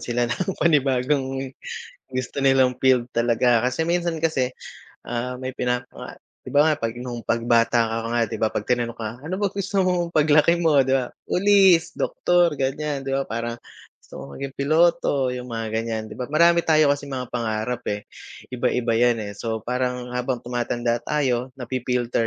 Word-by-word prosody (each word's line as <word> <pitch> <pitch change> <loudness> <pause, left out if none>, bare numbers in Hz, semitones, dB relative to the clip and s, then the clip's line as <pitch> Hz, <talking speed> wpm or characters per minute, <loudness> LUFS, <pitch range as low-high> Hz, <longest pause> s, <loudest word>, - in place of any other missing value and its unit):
sila 120 0 -1
ng 185 +10 -2
panibagong 135 -3 +1 0.6
gusto 130 +1 -5
nilang 135 -2 +4
field 130 -2 +4
talaga. 120 0 +2
Kasi 145 +6 -1
minsan 170 0 0
kasi, 135 -6 +1 0.6
ah, 125 +1 -3
may 130 0 -5
pinapa 125 0 -4 0.2
'Di - - -9
ba, 145 +1 +4
nga 155 - +3
p'ag 115 -3 -4
nung 120 -2 -6
'pag 115 - 0
bata 115 0 +3
ka 115 0 -3
nga 120 0 +1
'di 110 - -7
ba 110 0 0
'pag 105 - -4
tinanong 120 -2 -1
ka, 115 +4 -6
ano 170 +5 -4
ba 205 - +1
gusto 200 +1 -2
mong 175 -2 0
paglaki 155 +2 +4
mo, 165 -3 +2
'di 130 - -2
ba? 130 -2 +2 0.2
Police, 190 -3 +4
doktor, 175 -1 +2
ganyan, 140 +1 -2
'di 135 - -1
ba? 135 - +1
Parang 115 -1 -4 0.5
gusto - - -26
mong 70 - -9
maging 135 -1 -6
piloto 155 -2 +2
yung 125 0 -5
mga, 115 -2 -4
ganyan, 110 0 -2
'di - - -10
ba? 125 - -3
Marami 170 +4 +3
tayo 155 -2 +4
kasing 140 -1 -2
mga 125 -2 -5
pangarap, 115 0 -2
eh, 105 0 -2 0.5
iba-iba 125 -1 0
yan, 120 -2 +3
eh. 100 - -6
So, 110 -2 -3
parang 125 0 -2
habang 125 0 -2
tumatanda 120 -1 -1
tayo 130 -4 0
nafi-filter 125 -2 -1
125 Hz, 175 wpm, -23 LUFS, 120-150 Hz, 0.6 s, nilang